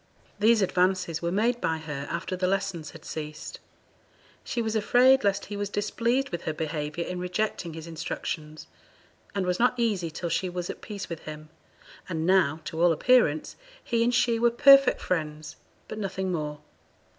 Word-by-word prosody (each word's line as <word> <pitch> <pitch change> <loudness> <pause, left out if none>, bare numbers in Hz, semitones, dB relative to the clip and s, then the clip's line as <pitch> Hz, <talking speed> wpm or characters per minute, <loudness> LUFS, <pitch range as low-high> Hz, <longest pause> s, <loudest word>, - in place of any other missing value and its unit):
These 220 0 +5
advances 180 -3 +1
were 170 0 -1
made 235 +5 +1
by 160 0 0
her 150 -3 -6
after 185 +2 -3
the 185 0 0
lessons 190 -5 -2
had - - -13
ceased. 155 -1 -6 0.8
She 240 - -3
was 220 -1 -1
afraid 255 +5 +5
lest 200 -1 +1
he 205 - -6
was 205 0 -3
displeased 235 +6 0
with 175 - -5
her 160 - -1
behaviour 155 +1 -3
in 180 0 -4
rejecting 180 -2 -2
his 160 -1 -7
instructions, 155 -1 -5 0.7
and 195 -2 0
was 180 0 0
not 245 +1 +3
easy 205 -8 0
till 170 +2 -4
she 175 +3 0
was 175 0 -4
at - - -12
peace 205 -2 -6
with 165 -2 -6
him; 155 0 -8 0.6
and 160 -2 -2
now, 170 -4 +3
to 160 - -4
all 175 0 +6
appearance, 165 -4 +3 0.3
he 230 -1 +1
and 240 +1 +2
she 240 -1 +2
were 235 +1 +4
perfect 275 +3 +6
friends, 155 -2 -3 0.3
but 215 - -6
nothing 190 -2 -2
more. 150 -3 -3
180 Hz, 175 wpm, -27 LUFS, 160-215 Hz, 0.8 s, all